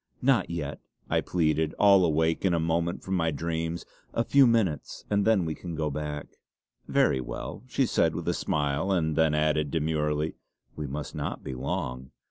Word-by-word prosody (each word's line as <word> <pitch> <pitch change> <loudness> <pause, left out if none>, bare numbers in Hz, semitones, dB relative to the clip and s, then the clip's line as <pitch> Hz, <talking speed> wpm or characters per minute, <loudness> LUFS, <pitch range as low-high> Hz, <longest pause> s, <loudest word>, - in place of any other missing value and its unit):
"Not 135 -1 +3
yet!" 75 -5 -4 0.3
I - - +3
pleaded, 80 -2 0
all 100 -2 +6
awake 80 0 +1
in 90 -3 +3
a - - +1
moment 85 +2 -1
from 95 - -3
my 80 -2 +2
dreams. 80 +2 -3 0.3
"A 115 - +2
few 140 +1 +5
minutes, 105 - 0
and 100 -1 +2
then 110 -6 +3
we 80 - -2
can 85 +1 -7
go 75 -1 -1
back." 75 0 -5 0.5
"Very 65 - +3
well," - - -6
she - - +1
said - - +2
with - - -5
a - - +2
smile, 75 +5 0
and 80 -4 +1
then 80 -2 +3
added 75 -1 +1
demurely; 75 0 0 0.4
"we 75 -1 -4
must 70 +2 -5
not - - -4
be 65 - -5
long." 65 0 -3
80 Hz, 180 wpm, -28 LUFS, 75-85 Hz, 0.5 s, all